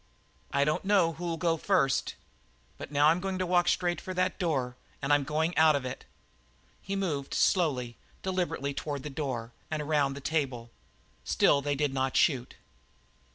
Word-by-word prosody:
"I 140 - +2
don't 150 +1 0
know 195 -4 +3
who'll 170 0 -4
go 165 0 +1
first. 140 -7 +1 0.6
But - - -8
now 145 +1 +5
I'm 165 +2 +3
going 190 0 -3
to 185 - -1
walk 175 0 +2
straight 175 -1 +1
for 185 - -6
that 185 +1 0
door, 135 -9 -1 0.2
and 140 +2 +1
I'm 145 -1 +3
going 155 +4 -1
out 160 -1 +5
of 140 -2 -2
it." 125 - -6 0.8
He 195 - -4
moved 155 -8 -2
slowly, 130 - +1 0.3
deliberately 180 -7 -1
toward 140 -1 -4
the 150 - -6
door, 125 -5 -4 0.2
around 150 -2 +1
the - - -6
table. 135 -6 -2 0.5
Still 140 - +3
they 145 0 -1
did 145 -1 0
not 130 -1 0
shoot. 130 -6 +2
150 Hz, 165 wpm, -29 LUFS, 135-175 Hz, 0.8 s, now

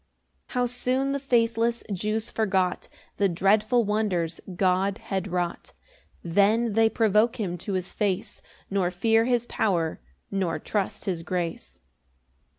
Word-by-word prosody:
2 - - -14
How 250 0 +2
soon 255 +2 0
the 280 - -1
faithless 235 -3 +1
Jews 215 +4 -2
forgot 190 -4 0 0.3
The 200 -1 +3
dreadful 210 +7 +3
wonders 200 -6 -1
God 190 +2 +2
had 190 -1 -3
wrought! 175 -2 -3 0.5
Then 205 +6 +3
they 225 +1 +4
provoke 220 +1 +3
him 185 -5 -2
to 200 +3 -4
his 185 -1 -3
face, 205 +1 -2 0.3
Nor 195 -3 +1
fear 225 +5 +2
his 240 -1 +1
power, 170 - 0 0.3
nor 185 -4 0
trust 205 -3 -3
his 180 -4 -1
grace. 170 - -4
205 Hz, 135 wpm, -26 LUFS, 185-225 Hz, 0.5 s, they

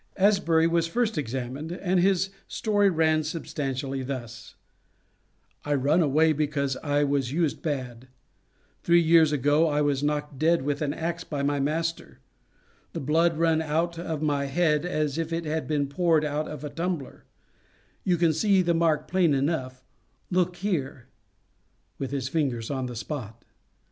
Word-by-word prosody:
Asbury 185 -5 +3
was 165 0 +2
first 230 +5 0
examined, 135 +2 -4
and 180 +1 0
his 190 +1 +2 0.2
story 205 -2 +2
ran 160 -2 +2
substantially 140 -4 -3
thus: 120 -4 -7 1.1
"I 145 0 0
run 145 +6 +2
away 155 +1 +3
because 140 -2 -1
I 145 -1 0
was 140 -3 0
used 160 0 0
bad; 130 -5 -4 0.7
three 170 0 +4
years 165 -2 +5
ago 145 +3 +3
I 150 -1 +1
was 145 -2 +1
knocked 150 -1 -2
dead 165 -1 +3
with 145 +1 -2
an 145 -2 0
axe 170 +3 -3
by 145 -3 -4
my 145 0 0
master; 165 +4 -2 0.8
the - - -3
blood 160 +3 +2
run 165 -1 +2
out 165 +2 -1
of 160 -3 -4
my 145 -2 0
head 150 +2 +1
as 155 -3 -1
if 165 0 -3
it 165 0 -2
had 155 +1 -2
been 150 -2 0
poured 160 +1 +1
out 150 +1 -2
of 150 -1 -7
a 150 - -5
tumbler; 170 -5 -4 0.8
you 180 -2 +2
can 165 -1 +3
see 190 +4 +3
the 170 -1 +2
mark 165 -2 +1
plain 175 -5 +2
enough 135 -3 -2 0.5
look 180 0 +1
here," 145 -10 -3 0.9
(with 135 - -3
his 135 -2 -3
finger 140 -5 0
on 130 -2 -2
the 125 - -7
spot). 115 -3 -6
155 Hz, 160 wpm, -26 LUFS, 140-170 Hz, 1.1 s, years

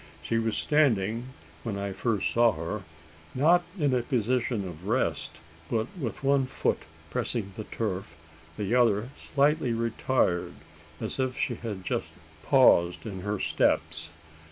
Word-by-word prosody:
She 115 - +1
was 115 -1 0
standing 115 -7 +2 0.4
when 110 -4 -3
I 100 0 -3
first 110 -1 0
saw 120 -1 +4
her: 85 +6 -4 0.5
not 165 +7 +5 0.2
in 145 -6 +2
a 125 - +2
position 120 -3 0
of 90 +2 -9
rest, 105 - -1 0.3
but 110 -1 +1
with 135 -7 -5
one 135 -1 +3
foot - - 0 0.3
pressing 105 -5 -2
the 110 - -6
turf, 100 -5 -3 0.4
the 105 +1 -1
other 115 -2 +3
slightly 140 -3 +1
retired, 115 -5 0 0.4
as - - -4
if 130 -1 0
she 125 - 0
had 105 -5 -6
just - - -2 0.3
paused 85 +4 +4
in 95 -4 -5
her 105 +2 -2
steps. 80 -2 +1
115 Hz, 140 wpm, -28 LUFS, 100-130 Hz, 0.5 s, not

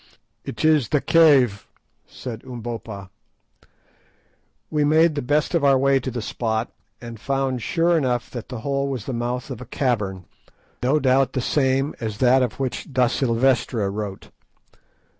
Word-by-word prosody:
"It 115 - -4
is 150 -7 +3
the 150 - +2
cave," 135 -11 +4 0.4
said 120 -2 -8
Umbopa. 115 -5 -7 1.6
We 150 -1 +1
made 155 +2 +4
the 145 - -2
best 150 +6 0
of 170 -4 +1
our 135 -1 +5
way 135 0 +3
to 130 - -4
the 120 -3 -4
spot, 110 0 -2 0.3
and 115 -2 -9
found 135 -1 -1
sure 170 +7 +1
enough 125 -6 0
that 120 -3 -7
the 125 -3 -6
hole 140 +1 -1
was 130 -6 -4
the 135 - -4
mouth 120 +2 -3
of 125 - -6
a - - -7
cavern, 105 -8 -2 0.6
no 135 +5 +2
doubt 130 -1 +2
the - - -1
same 135 +2 +1
as 110 -3 -4
that 130 +2 +4
of 125 -1 -2
which 135 +2 -4
da 130 -1 +3
Silvestra 120 -4 +1
wrote. 100 -2 -6
130 Hz, 160 wpm, -22 LUFS, 115-140 Hz, 1.6 s, our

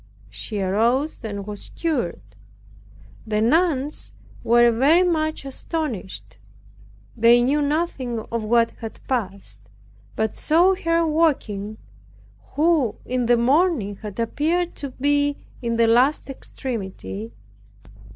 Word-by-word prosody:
She 210 -3 -5
arose 235 +11 0
and 200 -3 -5
was 205 -1 -8
cured. 245 - -2 1.0
The 210 -1 0
nuns 295 +3 +1 0.3
were 240 +1 +5
very 285 +10 +4
much 315 -5 -1
astonished. 210 - -5 0.8
They 235 +2 +5
knew 285 +4 +2
nothing 285 -5 -1
of 230 -1 -2
what 230 +1 +3
had 225 -2 -8
passed, 195 - -3 0.6
but 220 0 -1
saw 345 +5 +4
her 335 -2 +1
walking, 250 -10 0 0.8
who 300 -7 +2
in 250 -1 -1
the 240 0 +4
morning 255 - +2
had 210 0 -8
appeared 320 +9 0
to 280 - -4
be 285 +2 +1 0.2
in 235 -1 -1
the 230 0 +4
last 255 +5 +3
extremity. 190 - -6
245 Hz, 110 wpm, -22 LUFS, 215-305 Hz, 1.0 s, were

